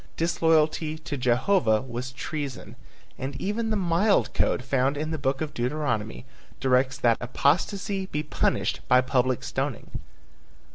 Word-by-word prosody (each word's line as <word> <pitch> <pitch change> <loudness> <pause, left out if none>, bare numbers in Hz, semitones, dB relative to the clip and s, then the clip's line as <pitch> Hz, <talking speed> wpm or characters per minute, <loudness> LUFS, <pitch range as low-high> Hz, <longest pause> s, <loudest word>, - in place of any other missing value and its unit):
Disloyalty 160 -1 +2
to 155 -2 -5
Jehovah 125 - +2
was 125 0 -5
treason, 140 0 -5 0.4
and 135 +1 -4
even 220 +3 -1
the 215 - +1
mild 195 +2 +2
code - - +1
found 135 +1 +1
in 155 +2 -3
the 160 - -3
book 135 0 -1
of 155 -2 -3
Deuteronomy 120 -4 -2 0.3
directs 130 +1 +2
that 115 -3 +3
apostasy 190 - 0
be 150 -4 -3
punished 150 - 0
by 125 0 +6
public 130 -1 +1
stoning. - - -4
145 Hz, 135 wpm, -26 LUFS, 130-165 Hz, 0.4 s, by